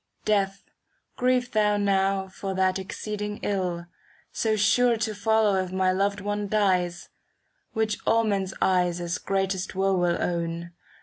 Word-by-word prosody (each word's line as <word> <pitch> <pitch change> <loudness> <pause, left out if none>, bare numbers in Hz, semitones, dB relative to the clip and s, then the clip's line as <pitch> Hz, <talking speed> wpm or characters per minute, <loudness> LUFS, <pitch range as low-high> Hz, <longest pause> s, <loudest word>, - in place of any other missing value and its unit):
Death, 195 -2 +1 0.5
grieve 250 0 +1
thou 210 -1 +2
now 195 -1 +1
for 190 0 -5
that 190 0 +1
exceeding 210 +2 -5
ill, 180 -4 -1 0.5
So 220 -1 0
sure 235 +3 +3
to 220 0 -2
follow 210 -1 +2
if 185 -1 -2
my 185 0 +2
loved 200 +1 0
One 205 +1 -2
dies; 185 -4 0 0.6
Which 220 -2 0
all 230 0 +4
men's 195 -3 -1
eyes 180 -2 +2
as 175 0 -3
greatest 195 -1 -2
woe 195 +1 +2
will 175 -1 +1
own. 170 0 -2
195 Hz, 140 wpm, -26 LUFS, 185-210 Hz, 0.6 s, all